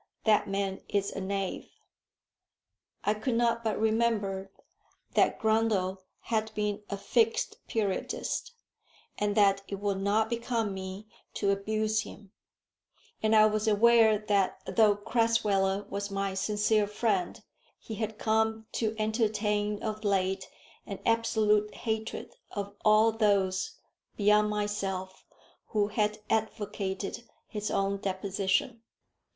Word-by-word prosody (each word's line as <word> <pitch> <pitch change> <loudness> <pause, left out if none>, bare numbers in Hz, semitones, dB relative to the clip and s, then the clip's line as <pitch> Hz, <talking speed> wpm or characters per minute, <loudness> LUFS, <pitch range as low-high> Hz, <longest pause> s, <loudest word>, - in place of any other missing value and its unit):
That 215 -1 +3
man 195 -1 -2
is 200 -1 0
a 195 - -5
knave." 195 0 -3 1.3
I 210 - +2
could 225 +3 -2
not 235 0 +2
but 220 -1 -1
remember 215 -4 0 0.6
that - - +3
Grundle 220 -4 +1 0.2
had 220 -1 -1
been 210 0 -1
a 200 - -3
Fixed 455 - +1
Periodist, 215 - -2 0.7
and 205 0 0
that 195 -1 +4
it 200 - -4
would 200 -1 -2
not 210 +2 +2
become 230 -2 -1
me 190 +2 -7 0.3
to 200 -1 +1
abuse 215 +2 0
him; 205 -2 -11 0.9
and 220 0 +3
I 215 0 +8
was 215 0 +1
aware 220 0 +5
that 205 -2 0
though 215 -2 +4
Crasweller 205 -3 +1
was 200 +1 -4
my 195 -1 -2
sincere 210 +2 +1
friend, 205 -4 -1 0.4
he 225 - -9
had 220 0 -3
come 220 0 +1
to 220 -1 -1
entertain 210 -1 0
of 215 -1 -3
late 190 -2 0 0.4
an 200 - -5
absolute 215 -2 +2
hatred 220 - -4 0.2
of 200 -1 -4
all 215 +1 +5
those, 200 -4 +1 0.4
beyond 210 0 +4
myself, 195 -3 -3 0.4
who 210 -2 +1
had 210 0 0
advocated 210 -1 -2 0.3
his 210 -1 -4
own 195 0 0
deposition. 195 +3 -1
210 Hz, 120 wpm, -29 LUFS, 200-220 Hz, 1.3 s, I